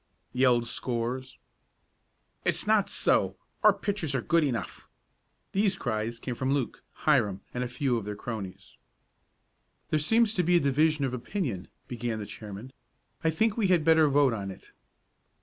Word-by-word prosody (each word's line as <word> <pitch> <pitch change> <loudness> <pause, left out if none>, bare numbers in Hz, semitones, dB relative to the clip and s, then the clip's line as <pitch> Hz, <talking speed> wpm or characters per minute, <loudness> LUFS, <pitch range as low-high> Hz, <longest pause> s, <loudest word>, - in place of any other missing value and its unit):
yelled 125 -2 +4
scores. 125 +2 -3 1.1
"It's - - 0
not 215 -2 +3
so! - - +2 0.3
Our - - +8
pitchers 185 -9 -2
are 130 - +1
good 170 -1 +3
enough!" 125 -5 -3 0.6
These 195 -1 +1
cries 115 -1 -2
came 125 - -4
from 130 +3 -1
Luke, 135 -4 -3 0.2
Hiram 105 -11 +3
and 125 - -2
a - - -2
few 125 0 0
of 110 - -4
their 105 0 -4
cronies. 100 -4 -7 1.1
"There 155 - +3
seems 225 +8 +3
to 180 - +2
be 175 +1 +3
a - - +6
division 150 +1 +2
of 130 - -3
opinion," 125 - -3 0.2
began 120 -2 -3
the 105 - -5
chairman. 105 +5 -9 0.5
"I 160 - +3
think 215 +7 +1
we 215 -4 +2
had 180 -4 +3
better 160 -2 +5
vote 140 -3 +4
on 100 -3 -4
it." 95 - -11
130 Hz, 160 wpm, -28 LUFS, 115-160 Hz, 1.1 s, Our